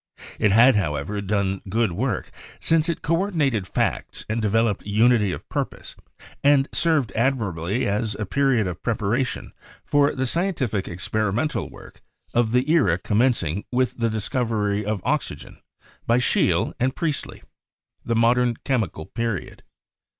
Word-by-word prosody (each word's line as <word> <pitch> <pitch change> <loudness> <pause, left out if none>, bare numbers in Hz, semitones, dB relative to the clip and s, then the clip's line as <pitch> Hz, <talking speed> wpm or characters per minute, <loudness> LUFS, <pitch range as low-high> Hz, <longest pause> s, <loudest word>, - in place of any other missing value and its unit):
It 105 - +3
had, 115 +3 +6
however, 80 +3 -2
done 100 -1 -1
good 110 0 +1
work, 110 +3 -2 0.3
since 165 +1 +2
it 170 - -3
coordinated 155 - 0
facts - - -2
and 110 +3 -1
developed 110 0 +1
unity 105 0 +3
of - - -7
purpose, - - -4 0.5
and 140 -1 +4
served 155 - +2
admirably 110 -5 0
as 105 +1 -1
a 105 - -3
period 135 0 +2
of 90 -2 -5
preparation 115 +3 -1 0.3
for 145 0 +2
the 130 - -1
scien 175 +8 0
tific 110 -9 -2
experimental 110 - -1
work - - -14 0.3
of 120 -2 +2
the 125 +3 +2
era 130 - +3
commencing 105 - +1
with 130 0 0
the 115 -1 +1
discovery 110 -2 -1
of 105 -2 -3
oxygen - - -3 0.5
by 115 - +4
Scheele 125 - +2
and 130 +2 0
Priestley 155 -5 -3 0.3
— - - -50
the 115 - -1
Mod 115 +2 +4
ern 120 -2 +1
Chemical 110 - -1
Period. 115 -2 -4
115 Hz, 145 wpm, -23 LUFS, 100-130 Hz, 0.5 s, had